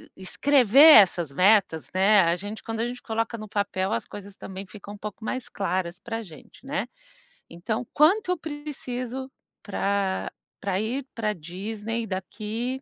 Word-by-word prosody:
e - - -15
escrever 260 +4 +3 0.2
essas 175 -6 0
metas, 185 0 +3
né, 195 +2 +5
a 170 -1 +2
gente 205 +4 -7
quando 225 0 -4
a - - +1
gente 245 +1 -6
coloca 225 +1 -2
no 215 -1 -7
papel, 200 -1 -1
as 230 - -2
coisas 200 -1 -10
também 190 0 -8
ficam 205 +1 -10
um - - -10
pouco 210 +1 -8
mais 255 +1 -4
claras 180 -2 -2
pra 225 +1 -5
gente, 170 0 -14
né. 275 -2 -3 0.6
Então: 220 +8 -4
"Quanto 360 +7 +4
eu 360 - 0
preciso 265 -4 -6 0.3
pra 200 -1 -1 0.3
pra 195 -2 -1
ir 250 +5 -3
pra 215 -2 -1
Disney 210 +6 -5
daqui 215 +6 -4
215 Hz, 160 wpm, -26 LUFS, 190-245 Hz, 0.6 s, né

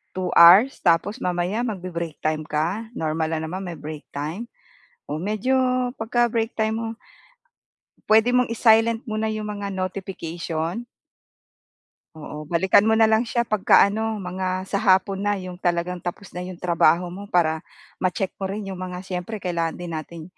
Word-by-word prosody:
2 185 -1 -2
hours 190 +10 +8
tapos 180 +7 +2
mamaya 180 +2 -1
magbe-break 175 -7 -4
time 155 0 0
ka, 170 +10 -1
normal 160 0 -1
lang 155 - -4
naman 180 +4 -5
may 175 -2 -6
break 150 0 -7
time. 160 +11 -4 0.6
Oh, 150 - -2
medyo 215 +8 0 0.4
'pagka 240 +2 +2
break 225 -1 -1
time 220 0 0
mo, 230 - -3 1.2
puwede 220 +2 +5
mong 250 0 +3
i-silent 225 0 +4
muna 215 0 -1
yung 215 -1 -4
mga 205 -1 -4
notification. 180 -1 -4 1.3
Oo, 150 -1 -8
balikan 190 +5 +4
mo 220 - +4
na 220 0 +4
lang 220 +2 +3
siya 235 +1 +1
pagka-ano, 215 0 +3
mga 185 +1 -2
sa 200 - 0
hapon 195 -1 +3
na, 205 - +2
'yong 185 -2 -7
talagang 175 0 -1
tapos 175 +3 -6
na 180 0 -6
'yong 180 -1 -7
trabaho 170 0 +3
mo 200 +3 -8
para, 165 -4 +2 0.4
ma-check 185 +1 -1
mo 195 - -2
rin 200 +1 -5
'yong 190 - -6
mga, 180 0 -6
siyempre 190 +3 -5
kailangan 170 -2 -1
din 175 -1 -7
nating 155 +1 -7
185 Hz, 160 wpm, -23 LUFS, 170-215 Hz, 1.3 s, hours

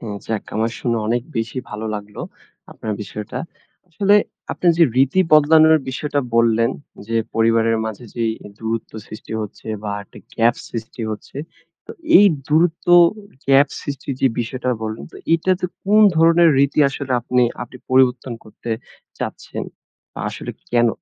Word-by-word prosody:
হ্যাঁ, 105 -3 -6
যাক 110 -2 -2
আমার 115 +1 0
শুনে 120 -2 -1
অনেক 120 +1 0
বেশি 115 +3 -2
ভালো 105 +1 -5
লাগলো, 105 0 -7 0.5
আপনার 110 - -5
বিষয়টা। 105 +3 -6 0.5
আসলে 200 +4 +2 0.4
আপনার 175 - +2
যে, 165 - +7
রীতি 135 +8 +3
বদলানোর 155 +1 +6
বিষয়টা 145 +2 -2
বললেন, 115 +1 +3 0.4
যে, 115 - -1 0.2
পরিবারের 115 0 +3
মাঝে 110 +2 -6
যে, 120 - -2 0.4
দূরত্ব 115 0 -4
সৃষ্টি 110 +1 -10
হচ্ছে, 105 +1 -8 0.2
বা 105 - -4
একটা - - -16 0.2
গ্যাপ 115 +1 +3
সৃষ্টি 115 +1 -7
হচ্ছে। 110 - -8 0.5
তো - - -9 0.3
এই 205 - +7 0.2
দূরত্ব, 165 +3 +1 0.6
গ্যাপ 135 +1 +6
সৃষ্টির 140 -1 -5
যে, 135 - +5
বিষয়টা 125 +2 -3
বললেন, 110 0 -5
তো - - -10 0.2
এটাতে 180 +2 +1 0.2
কোন 210 +2 +4 0.2
ধরনের 165 +1 +5
রীতি 140 +2 +2
আসলে 140 -1 -5
আপনি, 125 +1 +2 0.2
আপনি 120 +1 -8
পরিবর্তন 130 -1 +2
করতে 110 +2 -10 0.5
চাচ্ছেন? - - -5 0.7
আসলে - - -7
কি - - -41
কেন? 120 0 +4
125 Hz, 145 wpm, -20 LUFS, 115-150 Hz, 0.7 s, যে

